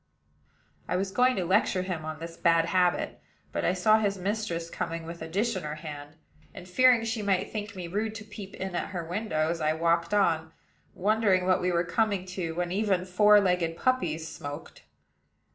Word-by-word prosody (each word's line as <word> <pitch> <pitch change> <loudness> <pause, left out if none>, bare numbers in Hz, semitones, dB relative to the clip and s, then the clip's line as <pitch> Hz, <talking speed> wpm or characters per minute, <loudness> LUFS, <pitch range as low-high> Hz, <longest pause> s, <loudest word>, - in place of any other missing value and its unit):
I - - -1
was 190 +1 -1
going 250 +4 +3
to 185 - -1
lecture 185 0 +2
him 175 -4 -4
on 155 0 -5
this 165 0 -7
bad 165 -1 +3
habit; 180 0 +1 0.3
but - - -2
I 180 - +2
saw 215 +4 +4
his 200 -2 0
mistress 190 -3 -2
coming 165 0 -4
with 170 0 -8
a 160 - -5
dish 205 +8 0
in 185 - -3
her 150 -1 -5
hand, 150 -1 -8 0.4
and, 180 - -9
fearing 245 +5 +5
she 225 -1 -2
might 195 -3 0
think 210 -1 -5
me 180 -2 -5
rude 215 +5 -2
to 215 - -7
peep 210 -2 -10
in 190 -1 -5
at - - -2
her 170 -2 -3
windows, 165 -3 -1
I 155 0 +2
walked 170 +1 +1
on, 165 -5 +1 0.4
wondering 200 -2 +2
what 185 0 +3
we 180 0 +1
were 170 0 +2
coming 200 +1 0
to 170 -4 -3
when 175 0 -2
even 195 -2 +1
four 210 +3 +6
legged 180 -4 0
puppies 170 -12 0
smoked. 145 -3 -8
180 Hz, 195 wpm, -28 LUFS, 165-205 Hz, 0.4 s, four